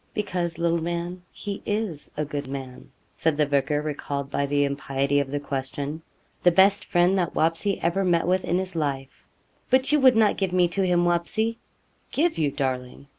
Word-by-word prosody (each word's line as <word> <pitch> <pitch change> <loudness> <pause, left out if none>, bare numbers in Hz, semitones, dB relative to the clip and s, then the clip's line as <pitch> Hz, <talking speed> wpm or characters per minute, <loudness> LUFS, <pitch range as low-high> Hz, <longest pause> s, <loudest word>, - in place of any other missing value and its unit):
'Because, 180 -5 -2
little 170 0 +1
man, 175 +2 -3
he 200 -1 -6
is 205 -8 -3
a 150 - 0
good 145 -1 -4
man,' 130 -2 -7 0.3
said 160 -2 0
the 150 - +3
vicar, 145 +1 0
recalled 140 -2 -4
by 140 0 0
the 145 0 +2
impiety 140 0 0
of 140 -1 -1
the 145 +1 -2
question. 140 +2 -4 0.4
'The 175 - +6
best 195 +3 +4
friend 175 +1 +3
that 175 -3 -1
Wapsie 165 +5 +1
ever 170 +4 +1
met 175 -2 +2
with 185 +2 +1
in 175 - 0
his 185 -1 -3
life.' 140 -4 -3 0.4
'But 260 +2 +3
you 300 - +4
would 260 -3 +6
not 220 -2 +3
give 190 -2 -1
me 180 -1 +4
to 195 +3 -1
him, 175 -2 +2
Wapsie?' 215 +7 0 0.5
'Give 325 +4 +1
you, 150 -2 +2
darling! 130 0 -4
170 Hz, 185 wpm, -25 LUFS, 140-185 Hz, 0.5 s, The